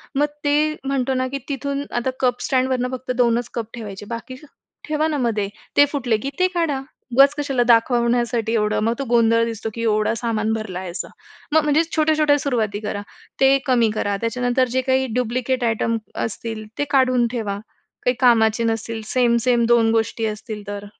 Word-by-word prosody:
मग 290 +2 +3 0.2
ते 300 +1 +2
म्हणतो 270 -1 0
ना, 255 0 0
की 275 +2 -4
तिथून 280 0 -2
आता 240 +2 -1
कप 250 -1 +1
स्टँडवर 255 -1 +1
फक्त 255 0 -4
2च 240 -1 +2
कप 230 -2 -4
ठेवायचे, 205 -3 -7
बाकी 235 +2 -6 0.5
ठेवणामध्ये. 280 -10 0 0.3
ते 285 - +8
फुटले 250 -6 0
की 265 +6 -4
ते 365 - +4
काढा, 310 -6 0 0.3
उगाच 275 +2 +7
कशाला 275 -4 +1
दाखवण्यासाठी 235 -1 +2
एवढं? 210 -2 +1
मग 230 +1 +2
तो - - -1
गोंधळ 230 -1 +4
दिसतो, 225 -1 -4
की 230 - -4
एवढं 215 -1 +1
सामान 220 -2 -1
भरला 215 -5 -4
आहे 185 -1 -6
असं. 175 - -5 0.4
म - - -1
मग 315 - +5
म्हणजे 300 +2 +3
छोट्या-छोट्या 305 -2 +3
सुरुवाती 225 -7 -1
करा, 205 -1 -3 0.4
ते 270 0 +6
कमी 240 -4 +3
करा. 205 -1 0
त्याच्यानंतर 245 +2 +1
जे 260 - +3
काही 260 0 +1
डुप्लिकेट 250 +1 -1
आयटम 230 0 0 0.3
असतील, 225 0 -6
ते - - +1
काढून 255 -3 +3
ठेवा. 215 -5 -3 0.5
काही 250 - +2
कामाचे 230 -2 +4
नसतील, 225 0 -2
सेम-सेम 240 -1 +2
2 230 -1 +4
गोष्टी 225 0 0
असतील, 215 0 -5
तर 205 0 -5
240 Hz, 170 wpm, -21 LUFS, 225-265 Hz, 0.5 s, ते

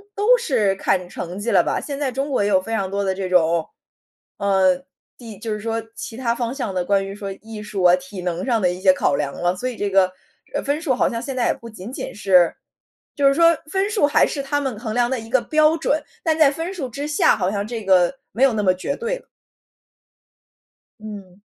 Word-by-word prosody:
都 450 +5 +4
是 235 - +1
看 180 -2 0
成 180 +2 -6
绩 230 +3 -2
了 - - +5
吧。 - - -1
现 285 -1 -5
在 270 -3 -1
中 275 +3 -2
国 255 - +1
也 205 - +1
有 190 -2 +3
非 225 +4 -6
常 195 -4 -1
多 200 0 -1
的 190 -1 0
这 190 -1 -3
种， 170 -2 +3 0.7
呃， 190 -2 +2 0.3
地 225 -5 -10
就 220 0 -3
是 210 - -4
说 225 +1 -2
其 225 - -7
它 235 -2 0
方 240 0 -2
向 245 -8 -4
的 180 -1 0
关 195 0 +2
于 195 - -6
说 200 -1 -6
艺 220 -1 -8
术 200 -3 -4
啊、 175 0 +7
体 185 +1 -9
能 175 0 -3
上 235 -4 +1
的 180 - +3
一 180 +1 -7
些 190 - +6
考 145 - +1
量 140 -1 -2
了， 175 +1 0
所 255 +7 -3
以 240 - -8
这 205 - -1
个， 190 -1 +4 0.4
呃， - - 0
分 290 +3 -1
数 290 -6 +1
好 - - +2
像 230 0 -4
现 270 0 -5
在 245 - +1
也 - - +2
不 230 - -11
仅 215 +1 -9
仅 - - -6
是 185 -4 +4 0.6
就 280 -1 +3
是 275 - +5
说 335 +1 +5
分 390 +1 +1
数 410 -9 +2
还 - - +4
是 285 - -3
他 290 +1 -1
们 255 -6 -3
衡 220 -2 -4
量 240 0 +2
的 260 - -1
一 225 - -10
个 260 +1 +3
标 310 +5 +3
准， 315 -1 0 0.2
但 320 -2 +1
在 300 -3 +7
分 330 +6 -4
数 290 -9 -4
之 280 +5 -5
下 295 - +3
好 185 -1 0
像 200 0 -2
这 225 -2 -5
个 185 +4 +4 0.2
没 235 - -5
有 270 -3 +5
那 210 -1 -1
么 185 -2 +4
绝 185 +10 -3
对 470 +2 -3
了。 - - -26 1.7
嗯。 200 -3 -10
220 Hz, 260 characters per minute, -21 LUFS, 190-275 Hz, 1.7 s, 啊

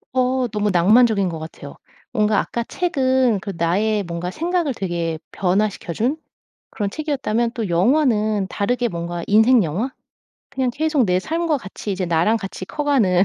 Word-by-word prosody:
어 255 0 +2
너무 210 -1 0
낭만적인 200 +2 +4
것 165 - -5
같아요. 155 -3 -9 0.4
뭔가 210 -1 +2
아까 235 - -2
책은 260 - +1
그 200 0 -6
나의 200 +5 +1
뭔가 170 0 -4
생각을 335 - -1
되게 170 -6 -3
변화시켜 195 -1 -1
준, 250 - 0 0.5
그런 205 -2 -3
책이었다면 240 -5 -1
또 225 -4 -3
영화는 215 - +2
다르게 245 +4 0
뭔가 170 -2 -4
인생 220 +3 +5
영화? 190 - -2 0.6
그냥 260 -2 -1
계속 300 0 +1
내 180 -3 +2
삶과 325 - -1
같이 200 0 -7
이제 185 -1 -2
나랑 170 +6 +2
같이 195 -3 -6
커가는, 220 -9 +2
215 Hz, 315 characters per minute, -21 LUFS, 185-255 Hz, 0.6 s, 인생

